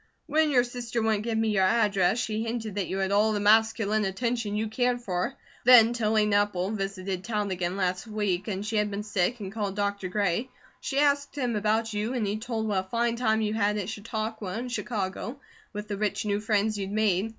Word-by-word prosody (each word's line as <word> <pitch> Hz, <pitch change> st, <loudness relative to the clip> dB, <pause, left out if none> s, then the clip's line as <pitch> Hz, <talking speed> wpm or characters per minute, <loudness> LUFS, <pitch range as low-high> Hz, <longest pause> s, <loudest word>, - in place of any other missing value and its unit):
"When 315 Hz, 0 st, +2 dB
your 250 Hz, -4 st, +4 dB
sister 240 Hz, -1 st, -4 dB
wouldn't 220 Hz, -1 st, +1 dB
give 230 Hz, -1 st, -1 dB
me 225 Hz, 0 st, +1 dB
your 195 Hz, -3 st, +2 dB
address, 205 Hz, -2 st, +3 dB
she 220 Hz, -2 st, -1 dB
hinted 225 Hz, -2 st, -3 dB
that 200 Hz, -2 st, -2 dB
you 190 Hz, -, -3 dB
had 195 Hz, 0 st, 0 dB
all 210 Hz, +2 st, +3 dB
the 205 Hz, -, 0 dB
masculine 215 Hz, 0 st, +3 dB
attention 220 Hz, +2 st, -1 dB
you 220 Hz, +1 st, 0 dB
cared 245 Hz, +2 st, 0 dB
for; 180 Hz, -5 st, -2 dB, 0.3 s
then 235 Hz, -2 st, +8 dB
Tilly 215 Hz, -2 st, +2 dB
Nepple 205 Hz, -2 st, +1 dB
visited 195 Hz, -2 st, -3 dB
town 210 Hz, -3 st, -2 dB
again 180 Hz, 0 st, -2 dB
last 185 Hz, +1 st, -1 dB
week 205 Hz, -3 st, -1 dB
and 200 Hz, -1 st, -3 dB
she 220 Hz, 0 st, -1 dB
had 210 Hz, 0 st, +1 dB
been 205 Hz, +1 st, -4 dB
sick 210 Hz, +3 st, 0 dB
and 195 Hz, -1 st, -5 dB
called 205 Hz, -2 st, -3 dB
Dr. 200 Hz, -2 st, -1 dB
Gray. 205 Hz, +5 st, 0 dB, 0.3 s
She 275 Hz, -, -3 dB
asked 285 Hz, 0 st, +2 dB
him 245 Hz, -4 st, 0 dB
about 215 Hz, +1 st, 0 dB
you, 210 Hz, +4 st, -2 dB
and 235 Hz, -4 st, 0 dB
he 205 Hz, +1 st, -1 dB
told 220 Hz, -1 st, -3 dB
what 190 Hz, -3 st, 0 dB
I -, -, -26 dB
fine 235 Hz, +1 st, +1 dB
time 220 Hz, -2 st, +1 dB
you 215 Hz, -1 st, 0 dB
had 210 Hz, -1 st, +1 dB
at 200 Hz, -1 st, -3 dB
Chautauqua 215 Hz, -2 st, -4 dB
and 245 Hz, +4 st, -4 dB
Chicago, 225 Hz, +2 st, -3 dB, 0.3 s
with 210 Hz, 0 st, -6 dB
the 205 Hz, -1 st, -3 dB
rich 210 Hz, +1 st, -1 dB
new 205 Hz, -1 st, 0 dB
friends 210 Hz, 0 st, 0 dB
you'd 195 Hz, -1 st, -3 dB
made. 210 Hz, -1 st, +1 dB
215 Hz, 215 wpm, -27 LUFS, 200-230 Hz, 0.3 s, then